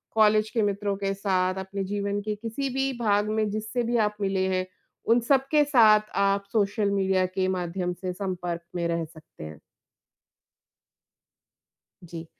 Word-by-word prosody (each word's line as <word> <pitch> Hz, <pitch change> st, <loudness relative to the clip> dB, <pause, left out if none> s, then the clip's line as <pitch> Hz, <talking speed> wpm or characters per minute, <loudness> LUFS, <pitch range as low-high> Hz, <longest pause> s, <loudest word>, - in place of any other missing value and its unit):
College 215 Hz, 0 st, +4 dB
के 230 Hz, -, 0 dB
मित्रों 200 Hz, 0 st, -1 dB
के 195 Hz, -1 st, -1 dB
साथ 185 Hz, -2 st, 0 dB
अपने 195 Hz, +1 st, -4 dB
जीवन 200 Hz, +1 st, -2 dB
के 210 Hz, 0 st, -3 dB
किसी 230 Hz, +6 st, -4 dB
भी 270 Hz, 0 st, 0 dB
भाग 210 Hz, -1 st, +1 dB
में 215 Hz, -1 st, 0 dB
जिससे 220 Hz, +3 st, -2 dB
भी 235 Hz, +1 st, 0 dB
आप 210 Hz, -, -6 dB
मिले 190 Hz, -1 st, 0 dB
हैं, 185 Hz, 0 st, -1 dB, 0.4 s
उन 230 Hz, +2 st, +4 dB
सबके 275 Hz, +2 st, +4 dB
साथ 215 Hz, -6 st, +5 dB, 0.2 s
आप 200 Hz, 0 st, +1 dB
सोशल 205 Hz, -1 st, +1 dB
मीडिया 190 Hz, -1 st, +2 dB
के 185 Hz, 0 st, +2 dB
माध्यम 180 Hz, +1 st, -3 dB
से 180 Hz, 0 st, -5 dB
संपर्क 180 Hz, -3 st, -4 dB
में 170 Hz, -1 st, -1 dB
रह 170 Hz, -1 st, -1 dB
सकते 155 Hz, -, -14 dB
हैं। 80 Hz, -1 st, -9 dB, 2.5 s
जी। 165 Hz, 0 st, -8 dB
200 Hz, 155 wpm, -26 LUFS, 185-215 Hz, 2.5 s, साथ